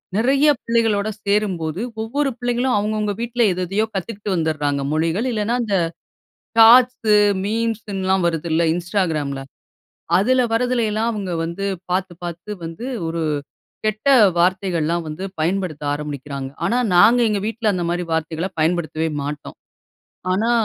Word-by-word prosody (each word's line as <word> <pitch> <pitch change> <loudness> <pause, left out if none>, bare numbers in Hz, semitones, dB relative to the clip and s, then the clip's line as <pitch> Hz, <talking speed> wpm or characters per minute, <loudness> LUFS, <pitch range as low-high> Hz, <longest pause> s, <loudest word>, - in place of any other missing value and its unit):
நெறைய 270 +7 +3
பிள்ளைகளோடு 225 -3 +1 0.2
சேரும்போது, 190 -5 0 0.2
ஒவ்வொரு 275 +6 -1
பிள்ளைங்களும் 245 +1 0
அவங்கவங்க 210 0 -1
வீட்ல 240 +1 -2
எது 180 +1 -3
எதையோ 205 +4 +1
கத்துக்கிட்டு 200 +1 -3
வந்துர்றாங்க. 150 -4 0
மொழிகள் 165 +8 0
இல்லைனா, 220 +1 0
இந்த 205 -4 0 0.8
டாட்ஸ், 245 +3 +7 0.5
மீம்ஸ்ன்லாம் 205 -4 -1
வருதுல்ல 165 0 0
இன்ஸ்டாகிராம்ல 165 -7 -1 0.8
அதுல 255 +7 +3
வர்றதுலைலாம் 230 -2 +1
அவங்க 200 -4 -4
வந்து 170 +4 -4 0.2
பார்த்து 185 0 -1
பார்த்து 175 +4 -6
வந்து 165 +8 -6 0.2
ஒரு 165 0 -3 0.6
கெட்ட 215 +4 -1 0.3
வார்த்தைகள்லாம் 170 -2 +1
வந்து 155 +5 -6 0.2
பயன்படுத்த 170 -2 -1
ஆரம்பிக்கிறாங்க. 145 -2 -5 0.2
ஆனா 240 - +1 0.2
நாங்க 230 +7 +6
எங்க 210 -2 0
வீட்ல 220 -1 0
அந்த 180 -2 -2
மாதிரி 175 +1 -1
வார்த்தைகள 160 +2 -1
பயன்படுத்தவே 160 0 0 0.2
மாட்டோம். 145 +1 -6 0.8
ஆனா 220 +5 +1
195 Hz, 120 wpm, -21 LUFS, 165-225 Hz, 0.8 s, டாட்ஸ்